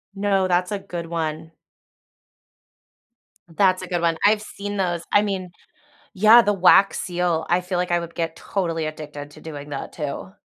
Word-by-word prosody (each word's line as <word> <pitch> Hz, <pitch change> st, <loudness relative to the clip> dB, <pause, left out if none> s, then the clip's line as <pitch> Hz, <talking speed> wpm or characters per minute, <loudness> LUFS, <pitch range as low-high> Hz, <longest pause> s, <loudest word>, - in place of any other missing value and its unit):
No, 195 Hz, -1 st, +1 dB
that's 180 Hz, +1 st, +1 dB
a 205 Hz, -, -2 dB
good 175 Hz, -3 st, -6 dB
one. 160 Hz, -1 st, -4 dB, 2.1 s
That's 185 Hz, -2 st, +3 dB
a 185 Hz, -, -7 dB
good 175 Hz, -1 st, -2 dB
one, 165 Hz, -1 st, +1 dB
I've 210 Hz, +1 st, +4 dB
seen 205 Hz, -1 st, -6 dB
those, 175 Hz, -3 st, -1 dB
I 205 Hz, -, +5 dB
mean 190 Hz, -3 st, -3 dB, 0.6 s
yeah, 220 Hz, +4 st, +7 dB
the 205 Hz, -, +2 dB
wax 195 Hz, +1 st, +5 dB
seal, 175 Hz, -2 st, -1 dB
I 175 Hz, +1 st, +2 dB
feel 180 Hz, 0 st, -3 dB
like 180 Hz, -1 st, -1 dB
I 175 Hz, -, +2 dB
would 170 Hz, 0 st, -8 dB
get 165 Hz, -1 st, -2 dB
totally 165 Hz, -3 st, -3 dB
addicted 150 Hz, -1 st, -7 dB
to -, -, -14 dB
doing 145 Hz, -2 st, -8 dB
that, 135 Hz, -, -6 dB
too. 150 Hz, +4 st, -5 dB
180 Hz, 170 wpm, -22 LUFS, 165-195 Hz, 2.1 s, yeah